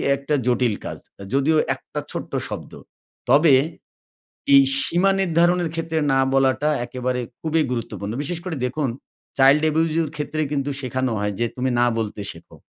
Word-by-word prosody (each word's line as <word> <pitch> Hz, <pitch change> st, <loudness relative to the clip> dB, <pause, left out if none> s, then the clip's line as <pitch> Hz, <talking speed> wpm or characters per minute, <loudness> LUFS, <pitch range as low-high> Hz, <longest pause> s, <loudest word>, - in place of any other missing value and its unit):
একটা 140 Hz, +2 st, -2 dB
জটিল 120 Hz, -3 st, +2 dB
কাজ। -, -, -6 dB, 0.2 s
এ -, -, -7 dB
যদিও 140 Hz, +4 st, +3 dB, 0.2 s
একটা -, -, -7 dB
ছোট্ট -, -, -6 dB, 0.2 s
শব্দ। -, -, -7 dB, 0.6 s
তবে 145 Hz, +3 st, +6 dB, 1.0 s
এই 140 Hz, -, +9 dB, 0.2 s
সীমা 180 Hz, +6 st, +2 dB
নির্ধারণের 175 Hz, -1 st, +2 dB
ক্ষেত্রে 165 Hz, -1 st, -2 dB
না 135 Hz, -, +3 dB
বলাটা 135 Hz, +2 st, +2 dB, 0.2 s
একেবারে 125 Hz, 0 st, -3 dB, 0.2 s
খুবই 160 Hz, 0 st, +1 dB
গুরুত্বপূর্ণ। 110 Hz, -3 st, -4 dB
বিশেষ 165 Hz, +3 st, -3 dB
করে 180 Hz, -4 st, -3 dB
দেখুন 140 Hz, +1 st, -2 dB, 0.5 s
চাইল্ড 135 Hz, +3 st, +6 dB
অ্যাবিউজ 160 Hz, +1 st, +1 dB
এর 165 Hz, -, +1 dB
ক্ষেত্রে 150 Hz, +1 st, -3 dB
কিন্তু 140 Hz, -1 st, -1 dB
শেখানো 130 Hz, -1 st, -2 dB
হয় 105 Hz, 0 st, -1 dB
যে, 120 Hz, -, +2 dB
"তুমি 130 Hz, +1 st, 0 dB
না 120 Hz, -, +4 dB
বলতে 105 Hz, -2 st, -3 dB
শেখো।" -, -, -15 dB
140 Hz, 155 wpm, -22 LUFS, 125-160 Hz, 1.0 s, এই